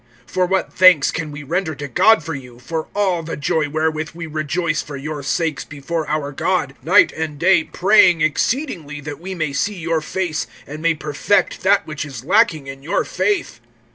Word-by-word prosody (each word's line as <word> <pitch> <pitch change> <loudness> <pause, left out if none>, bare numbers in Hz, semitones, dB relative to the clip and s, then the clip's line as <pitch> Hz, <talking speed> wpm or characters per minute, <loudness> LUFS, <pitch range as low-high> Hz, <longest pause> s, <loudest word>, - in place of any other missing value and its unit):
(9)For 180 -1 -1
what 190 0 0
thanks 180 -6 +6
can 155 -2 -4
we 145 0 -8
render 160 +2 -2
to 145 +1 -6
God 185 - +4
for 160 0 -4
you, 125 -3 -9
for 160 +6 -4
all 190 -4 +1
the 165 0 -6
joy 150 +1 0
wherewith 155 +1 -1
we 170 0 -6
rejoice 155 +1 -1
for 145 -1 -8
your 150 +1 -5
sakes 155 +1 -1
before 150 +3 -4
our 150 -1 -1
God; 145 -1 -1
(10)night 185 +6 +5
and 160 -2 -4
day 170 0 +4
praying 180 -3 +4
exceedingly 155 - -1
that 145 0 -7
we 190 +2 -6
may 155 -5 -2
see 205 +9 -1
your 165 -2 -1
face, 165 0 -3 0.2
and 150 +2 -8
may 165 0 +2
perfect 155 +7 0
that 200 +2 +3
which 150 -1 -5
is 135 -5 -8
lacking 185 -5 +3
in 135 0 -8
your 170 +8 -1
faith? 185 - -1
160 Hz, 190 wpm, -20 LUFS, 145-180 Hz, 0.2 s, thanks